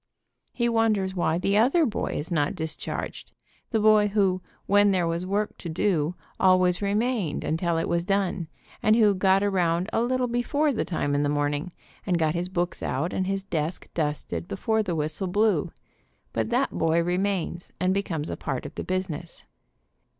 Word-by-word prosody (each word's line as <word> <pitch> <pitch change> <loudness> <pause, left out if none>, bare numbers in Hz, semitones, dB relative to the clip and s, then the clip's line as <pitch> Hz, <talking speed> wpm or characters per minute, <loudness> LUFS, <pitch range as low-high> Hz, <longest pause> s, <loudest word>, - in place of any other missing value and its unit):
He 240 -1 0
wonders 220 -5 +1
why 170 -3 +1
the 195 +3 +1
other 275 +9 +4
boy 225 - -2
is 155 +5 -4
not 150 +1 +1
discharged, 160 -3 -4 0.4
the 225 - +1
boy 215 -1 +5
who, 195 -3 +1 0.2
when 205 +1 +5
there 185 -3 +2
was 170 +2 -2
work 205 +2 -1
to 170 - -6
do, 165 -1 0 0.2
always 185 -1 +4
remained 205 - 0
until 165 +1 0
it 165 - -1
was 170 0 0
done, 190 -3 0 0.3
and 215 +1 +4
who 215 -3 +5
got 190 +1 +3
around 180 -2 +1
a - - +2
little 255 +1 +1
before 260 +5 +1
the 225 - -1
time 145 -5 -1
in 145 - +2
the 145 - +1
morning, 145 +3 -1 0.3
and 180 -3 +1
got 160 -2 +1
his 175 +1 -2
books 175 -1 -2
out, 160 +7 -2
and 185 - -1
his 195 0 -1
desk 165 -3 -3
dusted 150 - -2
before 220 - 0
the 180 -5 -2
whistle 155 +4 -2
blew, 210 +4 +2 0.6
but - - -1
that 250 +3 +1
boy 165 +1 +2
remains, 180 -1 -1
and 185 +1 +2
becomes 165 -6 -2
a - - -2
part 135 -3 -4
of - - -7
the - - -5
business. 180 -3 -4
185 Hz, 180 wpm, -26 LUFS, 165-205 Hz, 0.6 s, boy